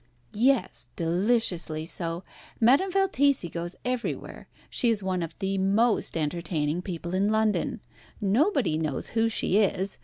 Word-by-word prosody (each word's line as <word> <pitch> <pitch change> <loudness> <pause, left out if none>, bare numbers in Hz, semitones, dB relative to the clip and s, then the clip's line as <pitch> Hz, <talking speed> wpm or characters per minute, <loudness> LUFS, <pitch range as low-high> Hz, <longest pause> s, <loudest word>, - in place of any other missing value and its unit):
"Yes, 255 +3 +1
deliciously 175 -3 0
so. 170 +1 -4 0.4
Madame 275 +12 +4
Valtesi 285 - +2
goes 170 +1 -4
everywhere. 250 -1 -4 0.2
She 240 - +1
is 215 -3 0
one 185 -1 -1
of 165 -1 -5
the 195 -1 -1
most 205 0 +2
entertaining 155 0 -1
people 175 -1 -5
in 195 +2 +2
London. 220 -1 0 0.4
Nobody 230 - +2
knows 155 -4 -3
who 225 0 +1
she 210 -2 +1
is. 195 -1 0
195 Hz, 130 wpm, -27 LUFS, 170-235 Hz, 0.4 s, Madame